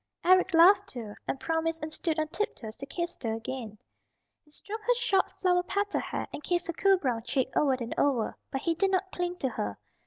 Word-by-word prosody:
Eric 370 0 +5
laughed 385 +4 +7
too, 225 -5 -7
and 270 - -2
promised 325 0 -1
and 310 0 -3
stood 325 -2 -1
on 310 0 0
tiptoes 285 - -3
to 275 - -7
kiss 345 +4 -4
her 225 -2 -1
again. 225 -2 -6 0.7
He 300 - -26
stroked 430 +8 -8
her - - +5
short 465 -6 +1
flower 360 -1 +3
petal 405 +3 -1
hair, - - -4
and - - -5
kissed 350 +2 0
her 340 - -3
cool 390 +3 +4
brown 250 -9 -1
cheek 260 +3 0
over 280 -3 +3
and 240 -3 -3
over. 255 -6 +1
But 270 - -3
he 335 - +1
did 385 +4 +1
not 380 0 0
cling 355 0 -2
to 265 - -1
her. 105 - -4
330 Hz, 215 wpm, -29 LUFS, 260-370 Hz, 0.7 s, laughed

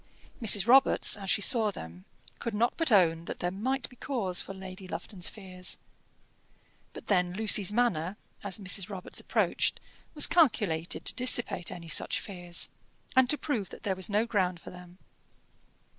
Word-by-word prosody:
Mrs. 205 -3 +4
Robarts, 265 +3 +5
as 195 -2 -7
she 205 - +2
saw 225 -2 +4
them, 90 - -9 0.3
could 230 -3 -4
not 235 +3 +2
but 330 -6 +1
own 170 -5 +4
that - - -6
there 175 - -2
might 260 +8 -2
be 250 - -18
cause 225 -9 -1
for - - -9
Lady 190 0 -9
Lufton's 180 +1 -3
fears. 185 -3 -6 1.2
But - - -10
then 180 -3 +1
Lucy's 210 -1 +3
manner, 205 -6 0 0.3
as 200 -3 -2
Mrs. 195 -1 -1
Robarts 190 -3 -5
approached, - - 0 0.4
was 295 - +7
calculated 205 - +1
to - - -1
dissipate 240 -7 0
any 170 -1 -8
such 165 - 0
fears, 175 -4 -3 0.5
and 260 -1 +5
to 300 - +2
prove 230 - -3
that - - -12
there 195 -2 -1
was 190 +1 -2
no 210 +2 +2
ground 185 -6 0
for - - -11
them. 180 0 -13
195 Hz, 165 wpm, -29 LUFS, 180-230 Hz, 1.2 s, was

